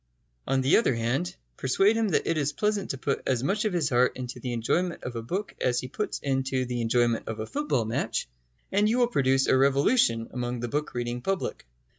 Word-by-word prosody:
On 135 0 +2
the 130 +3 +5
other 225 - +2
hand, 115 -6 -1 0.2
persuade 195 - +3
him 225 -1 +1
that 175 - +1
it 165 - +1
is 145 -1 0
pleasant 210 +5 -1
to 135 - -2
put 140 +1 -1
as 125 -2 +1
much 205 +8 0
of 210 - 0
his 165 -6 +1
heart 125 +1 +3
into 125 0 -6
the 125 0 -4
enjoyment 170 +10 -1
of 125 - -5
a 115 - -3
book 190 - -4
as 125 -1 +2
he 130 - -6
puts 210 - -3
into 130 -1 0
the 120 -1 -3
enjoyment 120 0 +1
of 110 -1 -4
a 110 - -2
football 280 - -1
match, 110 - -2 0.4
and 205 +2 +3
you 235 - +2
will 245 - +5
produce 135 - +2
a - - +3
revolution 135 - +3
among 125 -1 -3
the 120 - -3
book 150 +2 -2
reading 120 0 -2
public. 195 - -3
130 Hz, 220 wpm, -27 LUFS, 120-180 Hz, 0.4 s, the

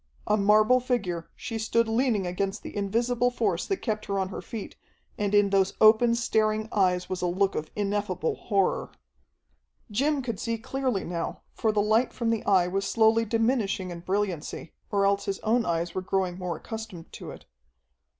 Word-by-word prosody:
A 210 - +3
marble 215 +4 +5
figure, 200 -10 -2
she 225 -2 -5
stood 230 +1 +1
leaning 225 -3 +1
against 195 +2 -2
the - - -8
invisible 235 +4 +1
force 210 -8 -1
that 390 - -2
kept 215 -2 -2
her 200 - -1
on 190 -1 -1
her - - -6
feet, 220 -3 -7 0.4
and 205 0 0
in 205 -1 +4
those 195 -1 +3
open, 225 +2 +6
staring 215 -2 +1
eyes 180 -3 +2
was 185 -1 -4
a 180 - +1
look 190 +2 +1
of 155 - -4
ineffable 200 -5 -1
horror. 200 -4 0 1.0
Jim 280 +5 +1
could 230 -5 -4
see 230 -1 -2
clearly 255 -2 -2
now, 170 -1 -4
for 220 - +1
the 210 -1 +1
light 220 +4 +2
from 230 -1 -1
the 225 - -1
Eye 185 -3 +4
was 195 +2 -1
slowly 225 0 +4
diminishing 225 -5 0
in 170 - -6
brilliancy, 185 -3 -3 0.2
or 200 -1 +2
else 200 0 +1
his 195 -1 -2
own 230 +1 +1
eyes 170 0 -1
were 185 - -2
growing 185 -1 -1
more 180 -2 -3
accustomed 220 -6 -8
to - - -8
it. - - -11
205 Hz, 180 wpm, -27 LUFS, 190-230 Hz, 1.0 s, open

